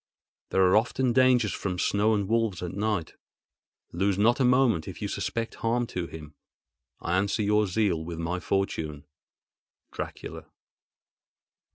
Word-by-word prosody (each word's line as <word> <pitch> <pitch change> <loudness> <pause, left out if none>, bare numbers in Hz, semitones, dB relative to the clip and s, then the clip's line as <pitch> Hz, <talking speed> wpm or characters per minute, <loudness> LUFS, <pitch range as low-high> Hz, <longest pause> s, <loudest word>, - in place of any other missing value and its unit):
There 95 - +3
are 90 - +4
often 120 +3 +2
dangers 125 -5 +4
from 95 -2 -3
snow 105 +4 +2
and 100 -2 -1
wolves 110 -5 0
and 90 0 -4
night. 100 -5 -1 0.8
Lose 95 +2 0
not 115 +5 +3
a - - +3
moment 125 -9 +3
if - - -7
you - - -2
suspect 115 0 -3
harm 120 +1 +1
to 90 -2 -2
him. 75 -2 -10 0.7
I 90 +2 0
answer 100 +3 0
your 105 0 +2
zeal 90 -4 0
with 85 0 -6
my 85 +2 -2
fortune.—Dracula. 75 -7 -6
100 Hz, 140 wpm, -27 LUFS, 85-115 Hz, 0.8 s, are